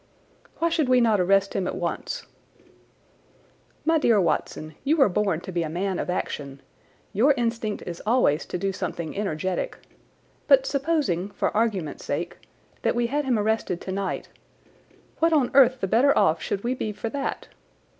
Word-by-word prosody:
"Why 335 - +1
should 315 -5 +1
we 255 0 +5
not 225 -4 +3
arrest 195 +2 +3
him 190 -2 -1
at - - -3
once?" 180 - -4 1.6
"My 325 0 +3
dear 230 -7 +4
Watson, 155 -2 -1
you 300 +4 +2
were 270 -8 +5
born 190 -3 0
to 185 - -7
be 175 -1 -1
a 160 - -2
man 185 +3 -2
of - - -3
action. 140 -6 -3 0.5
Your 265 +8 +4
instinct 230 -3 -2
is 170 -1 -6
always 215 - +2
to - - -3
do 195 +2 -1
something 170 -3 -4
energetic. 190 - -2 0.7
But - - +6
supposing, 280 - 0
for - - -2
argument's 205 -9 -1
sake, - - -3 0.4
that - - +1
we 240 0 +1
had 295 0 +1
him 250 -3 +2
arrested 210 -4 0
tonight, 190 0 -3 0.9
what 330 0 +3
on 280 -6 +3
earth 260 -1 +5
the 195 - 0
better 255 +8 +4
off 170 -6 +3
should 200 - -3
we 245 +2 0
be 220 -4 -3
for 225 +2 -5
that? 275 +3 -4
210 Hz, 165 wpm, -25 LUFS, 180-260 Hz, 1.6 s, But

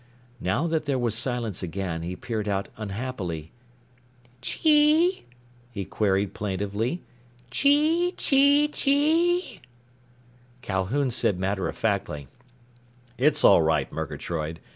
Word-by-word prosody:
Now 95 - 0
that 160 -2 -1
there 140 -2 0
was 120 -3 0
silence 120 -3 0
again, 90 -2 -4
he 90 +2 -5
peered 110 0 -4
out 100 -1 -1
unhappily. 100 -7 -5 0.9
"Chee?" 310 - +3 0.4
he 100 -4 -5
queried 100 -1 0
plaintively. 105 - -3 0.5
"Chee 310 - +2
chee 285 +2 +4
chee?" 305 - +1 1.0
Calhoun 105 +8 -1
said 105 -5 +1
matter 95 0 -1
of - - -7
factly, 100 -10 -2 0.9
"It's 145 +2 +3
all - - +7
right, 80 0 +1
Murgatroyd. 80 0 -4
115 Hz, 105 wpm, -25 LUFS, -, 1.0 s, all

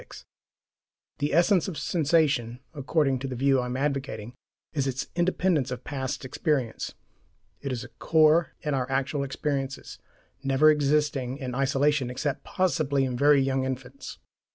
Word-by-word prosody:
The 145 - 0
essence 175 +4 +3
of 180 -6 -5
sensation, 145 -7 +1
according 140 -2 +1
to 135 - -4
the 130 - -4
view 135 +1 +3
I 125 - -2
am 125 +1 -3
advocating, 135 -5 -3 0.4
is 140 -3 0
its 135 0 -2
independence 175 -5 +1
of 125 -1 -5
past 130 -2 -4
experience. 130 -3 -2 0.7
It 140 - -3
is 125 -2 -3
a - - -9
core 160 +1 +3
in 150 - -2
our 130 -1 -1
actual 135 +2 0
experiences, 135 0 -3 0.4
never 140 +3 +5
existing 145 -3 +1
in 130 -3 -5
isolation 135 0 +1
except 135 +3 -3
possibly 155 -7 +1
in 125 -1 -3
very 140 +1 +5
young 135 0 0
infants. 130 0 -6
140 Hz, 145 wpm, -27 LUFS, 130-150 Hz, 0.7 s, never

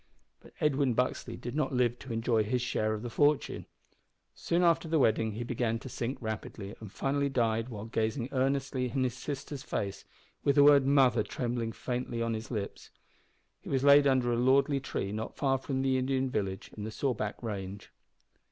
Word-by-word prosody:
But - - -17
Edwin 140 -4 +2
Buxley 125 -1 -1
did 120 +2 -6
not 145 -3 0
live 120 -1 +1
to 130 - -9
enjoy 115 -1 +1
his 125 +3 -1
share 110 -2 0
of 105 - -7
the 120 - -4
fortune. 145 +2 +1 0.7
Soon 170 +1 0
after 170 -1 +3
the 160 0 +2
wedding 110 -4 +2
he 115 +3 -4
began 120 -1 -1
to 130 - -9
sink 125 +2 -3
rapidly, 110 -2 -5
and 110 -3 -9
finally 140 +4 0
died 115 -2 0
while 105 -3 -6
gazing 115 +2 -1
earnestly 135 -1 0
in 130 +2 0
his 125 -2 0
sister's 140 +1 -5
face, 100 -5 -3 0.4
with 140 - +3
the 145 - +7
word 140 -2 +6
"mother" 130 -5 +4
trembling 120 0 -2
faintly 120 0 -3
on 115 0 0
his 110 +1 -5
lips. 105 -5 -5 0.7
He - - -9
was 135 -1 +1
laid 140 0 +7
under 130 -3 +2
a - - +1
lordly 135 +3 +3
tree 100 -6 -3
not 110 +1 -5
far 135 -2 +1
from 135 0 -2
the 130 -1 +2
Indian 130 0 0
village 95 -4 -3
in 105 - -6
the 110 - -4
Sawback 110 -2 -2
range. 100 -3 -5
125 Hz, 190 wpm, -30 LUFS, 110-135 Hz, 0.7 s, the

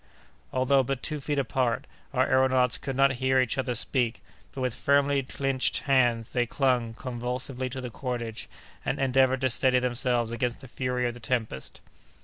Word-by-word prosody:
Although 130 +1 +3
but 130 0 -3
two 155 -1 -2
feet 145 +1 -2
apart, 125 -2 0 0.3
our 130 -1 +2
aëronauts 130 -2 +3
could 135 -1 -4
not 135 +1 +4
hear 130 0 +3
each 130 +1 +1
other 125 -2 -1
speak, 120 -1 +1 0.3
but 135 - -6
with 125 -2 0
firmly 140 +2 +2
clinched 135 0 -1
hands 120 -5 +2
they 120 -1 +1
clung 125 -3 +1
convulsively 125 +1 -3
to 130 +1 -5
the 125 -1 -6
cordage, 120 -3 -5 0.3
and - - -1
endeavored 130 -1 +3
to 130 - +2
steady 130 +2 +3
themselves 120 -2 0
against 120 +2 -2
the 135 - -10
fury 125 0 -1
of 120 - -3
the 120 - -11
tempest. 110 - -3
130 Hz, 170 wpm, -27 LUFS, 120-135 Hz, 0.3 s, not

